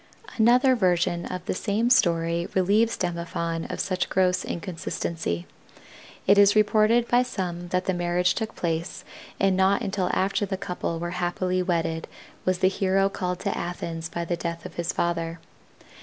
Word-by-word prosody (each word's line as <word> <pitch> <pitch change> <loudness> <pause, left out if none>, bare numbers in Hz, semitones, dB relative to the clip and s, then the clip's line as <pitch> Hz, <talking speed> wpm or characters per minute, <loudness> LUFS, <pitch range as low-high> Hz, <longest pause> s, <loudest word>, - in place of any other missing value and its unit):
Another 250 +3 +5
version 175 -4 +1
of 180 -1 -6
the - - -1
same 220 +5 0
story 170 -6 +2
relieves 205 +5 +3
Demophon 170 -1 -3
of - - -5
such 185 -1 -1
gross 185 -1 +2
inconstancy. 165 - -4 0.8
It 200 +1 +5
is 205 0 +6
reported 215 +2 +4
by 245 0 +4
some 180 -8 -4
that 180 +1 -1
the 190 - +1
marriage 175 +1 +1
took 220 -1 -4
place 165 0 -3 0.4
and 195 -1 +3
not 190 +1 +3
until 195 -2 -1
after 195 +2 0
the 190 - -3
couple 180 -3 -3
were 175 +1 -4
happily 180 +1 0
wedded 165 -3 -1 0.4
was 185 0 +2
the - - +7
hero 195 0 +2
called 180 -2 -3
to 200 - -1
Athens 165 -2 -4
by 170 +1 -4
the 175 - -1
death 170 0 -5
of - - -8
his 170 +1 -2
father. 165 -1 -1
180 Hz, 160 wpm, -25 LUFS, 170-195 Hz, 0.8 s, the